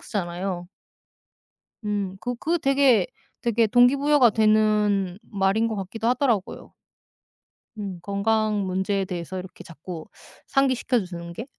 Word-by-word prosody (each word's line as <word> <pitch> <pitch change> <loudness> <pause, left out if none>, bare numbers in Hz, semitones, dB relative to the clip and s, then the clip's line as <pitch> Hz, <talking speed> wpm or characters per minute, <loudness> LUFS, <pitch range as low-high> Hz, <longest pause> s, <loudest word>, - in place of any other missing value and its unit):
쓰잖아요. 180 -2 -4 1.2
음 200 -2 -2
그 245 0 -3
그 335 +7 0
되게 270 - +3 0.3
되게 230 -1 +2
동기부여가 255 +3 +5
되는 210 -3 +2
말인 200 +3 +1
것 220 -1 -3
같기도 205 +4 -3
하더라고요. 245 -6 -1 1.0
음 195 -4 -5
건강 210 +1 0
문제에 190 +1 -1
대해서 180 0 -5
이렇게 180 0 -10
자꾸 165 0 -9 0.4
상기시켜 260 -3 +1
주는 170 -1 -8
게? 225 - -6
210 Hz, 260 characters per minute, -24 LUFS, 190-235 Hz, 1.2 s, 동기부여가